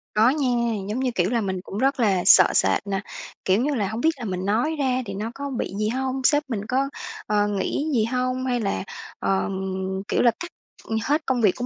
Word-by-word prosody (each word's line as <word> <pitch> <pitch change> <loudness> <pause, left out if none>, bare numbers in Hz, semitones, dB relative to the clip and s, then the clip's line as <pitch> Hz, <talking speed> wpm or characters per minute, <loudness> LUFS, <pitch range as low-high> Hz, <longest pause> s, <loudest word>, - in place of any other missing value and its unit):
Có 220 +3 +5
nha, 285 -1 0 0.4
giống 225 +5 -2
như, 255 -2 0
kiểu 180 +2 +2
là, 235 -1 +1
mình 190 -3 -3
cũng 200 - -8
rất 270 +3 +1
là 195 -6 +2
sợ - - +9
sệt 205 - +2
nè, 195 -1 -1 0.4
kiểu 195 +5 +3
như 290 +2 0
là, 205 -5 0
hông 220 +4 -4
biết 320 - +4
là 240 - -5
mình 185 -2 -3
nói 235 +11 +1
ra 260 -2 +1
thì 195 - -6
nó 215 +4 -4
có 280 0 -5
bị 240 -7 -3
gì 215 - +1
hông? 265 +2 -2
Sếp 295 +2 +4
mình 210 -3 -3
có, 265 +4 0 0.4
ờ, 210 0 +2
nghĩ 205 +9 -1
gì 220 -3 +2
hông? 255 +1 -1
Hay 250 -1 0
là, 200 -4 -2 0.4
ờ, 195 +1 0 0.6
kiểu - - +1
là, 235 - +5
cắt 345 +1 -6 0.5
hết 300 +5 0
công 255 -2 0
việc 205 -5 +4
của 245 - -4
235 Hz, 230 wpm, -24 LUFS, 205-265 Hz, 0.6 s, sợ